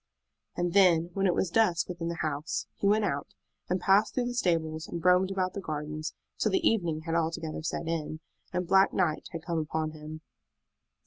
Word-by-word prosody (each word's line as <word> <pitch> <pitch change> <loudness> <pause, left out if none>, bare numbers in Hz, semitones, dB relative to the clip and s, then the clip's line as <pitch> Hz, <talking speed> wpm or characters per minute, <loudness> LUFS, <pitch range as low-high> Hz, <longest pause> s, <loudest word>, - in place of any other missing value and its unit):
And 175 -1 0
then, 175 -4 +5
when 195 +1 +1
it 175 - +2
was 180 - 0
dusk 175 -8 +3
within 175 -2 -4
the 170 -1 -3
house, 150 +1 -2
he 200 - 0
went 210 +1 +3
out, 145 -7 -3 0.3
and 180 +1 +1
passed 195 +4 +3
through 250 - +1
the 245 - -2
stables 165 -7 0
and 170 0 -6
roamed 180 +1 +5
about 185 -1 -1
the 200 - -4
gardens 155 -1 -4 0.2
till - - +2
the 360 -4 +3
evening 170 -8 +1
had 165 +1 -4
altogether 165 -1 -1
set 160 +1 -3
in, 155 -1 -3 0.3
and 180 -1 -1
black 195 +2 +5
night 165 -5 0
had 165 -1 -7
come 170 -2 -1
upon 155 0 -2
him. 155 0 -9
170 Hz, 195 wpm, -29 LUFS, 155-190 Hz, 0.3 s, then